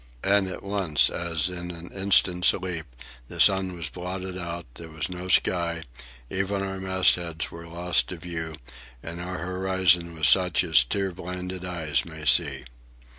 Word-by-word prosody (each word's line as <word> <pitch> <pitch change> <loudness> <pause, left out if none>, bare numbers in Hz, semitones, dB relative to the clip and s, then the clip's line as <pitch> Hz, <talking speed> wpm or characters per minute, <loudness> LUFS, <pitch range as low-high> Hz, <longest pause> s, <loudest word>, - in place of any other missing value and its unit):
And 100 0 +3
at 95 - -6
once, 100 -6 +1
as 85 -1 0
in 90 -1 -5
an 85 0 -9
instant's 95 -2 +3
leap, 90 -4 -5 0.4
the - - -9
sun 95 -2 +6
was 85 -4 -4
blotted 90 +3 -6
out, 85 -2 -5
there 80 +6 -9
was 80 0 -4
no 90 0 -6
sky, 85 -2 +1 0.4
even 95 +5 -2
our 95 0 -4
mastheads 90 -3 +1
were 85 0 -10
lost 85 +1 0
to 90 - -6
view, 80 -1 -6 0.5
and 85 +1 -6
our 90 +1 -5
horizon 90 -1 +1
was 80 -2 +2
such 90 0 +4
as 80 -7 +5
tear 95 +9 -2
blinded 90 +1 -6
eyes 80 -7 -1
may 80 -1 -10
see. 70 -5 +3
90 Hz, 160 wpm, -26 LUFS, 85-95 Hz, 0.5 s, sun